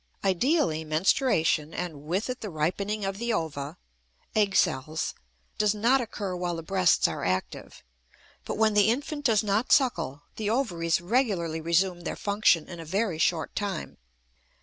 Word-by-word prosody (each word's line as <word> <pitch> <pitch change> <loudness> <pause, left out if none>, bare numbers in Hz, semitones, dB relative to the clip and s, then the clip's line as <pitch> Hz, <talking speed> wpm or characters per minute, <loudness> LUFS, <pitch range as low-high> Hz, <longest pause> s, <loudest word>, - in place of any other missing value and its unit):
Ideally, 195 - +1
menstruation, 160 - +1
and 165 -5 -4
with 185 +7 -1
it 255 0 -5
the 210 - -4
ripening 195 +6 -2
of 195 +1 -3
the 235 0 -1
ova 155 -4 -3 0.6
(egg 205 -3 +2
cells), 155 -1 +1 0.5
does 210 0 +3
not 240 +5 +3
occur 205 -5 -4
while 175 -1 -2
the 165 - -6
breasts 185 0 +3
are - - -4
active; 95 +1 -3 0.6
but - - -4
when 220 0 +3
the 205 0 +4
infant 290 +4 -2
does 220 -3 +3
not 210 +4 0
suckle, 165 - +2
the 215 -2 -1
ovaries 170 - 0
regularly 175 -6 0
resume 175 +2 +1
their - - -4
function 200 -6 +2
in 175 -2 -9
a - - -6
very 190 +1 -1
short 170 -1 0
time. 200 -2 -4
190 Hz, 155 wpm, -27 LUFS, 165-215 Hz, 0.6 s, the